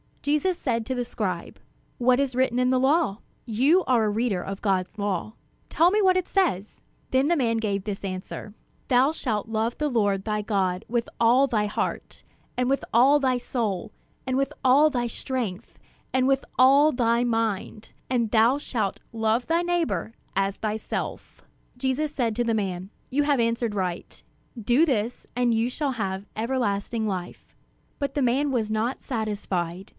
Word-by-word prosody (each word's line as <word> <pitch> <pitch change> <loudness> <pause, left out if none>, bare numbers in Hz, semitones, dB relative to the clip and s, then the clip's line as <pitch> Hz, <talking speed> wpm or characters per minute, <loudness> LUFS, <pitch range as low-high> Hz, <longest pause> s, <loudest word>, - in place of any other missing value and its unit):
Jesus 300 +5 +1
said 230 -4 -1
to 260 - -2
the 245 -1 -2
scribe: 185 -7 -4 0.4
"What 250 +1 +3
is 275 -3 0
written 250 -1 +1
in 250 0 +3
the 255 0 +3
law? 275 -5 +2 0.3
You 270 - +3
are 240 -4 +3
a - - +1
reader 210 -3 0
of 195 +1 -6
God's 190 -2 0
law; 200 0 -2 0.3
tell 335 +2 +4
me 420 +3 +2
what 370 -2 +4
it 370 - -1
says." 265 - 0 0.3
Then 260 +2 +2
the 345 - +3
man 235 -6 +1
gave 200 -3 -1
this 205 -1 -5
answer: 190 +2 -6 0.3
"Thou 260 +3 +4
shalt 225 -10 -2
love 225 +1 -1
the 300 -1 0
Lord 205 -6 +1
thy 210 0 -1
God 195 -2 -1
with 235 0 -1
all 245 +4 +5
thy 215 -5 +1
heart, 205 - -4 0.3
and 250 0 +1
with 275 - 0
all 265 +6 +6
thy 260 -2 +1
soul, 220 -5 -3 0.4
and 260 0 0
with 275 0 0
all 280 +4 +5
thy 245 -3 -1
strength, 235 -4 -4 0.3
and 260 0 +3
with 270 0 +2
all 275 +4 +6
thy 235 -2 +2
mind; 225 -2 -2 0.2
and 235 -3 +1
thou 230 +6 +4
shalt 220 -9 -2
love 225 +1 0
thy 335 +1 +2
neighbor 325 - -1 0.2
as 195 0 0
thyself." 215 0 -4 0.3
Jesus 270 +4 -1
said 235 -6 0
to 240 - +1
the 230 -1 0
man: 190 -2 -3 0.2
"You 290 +3 +1
have 285 -2 +2
answered 230 -1 0
right; 180 -3 -4 0.4
do 240 +8 +3
this, 240 -5 -1
and 245 -1 +2
you 225 +1 +1
shall 275 +2 -2
have 195 -3 -3
everlasting 225 -2 -1
life." 185 -3 -6 0.4
But 280 -2 -2
the 285 - 0
man 270 +4 +2
was 225 -5 0
not 220 +4 -1
satisfied. 200 -6 -3
235 Hz, 170 wpm, -25 LUFS, 210-265 Hz, 0.4 s, all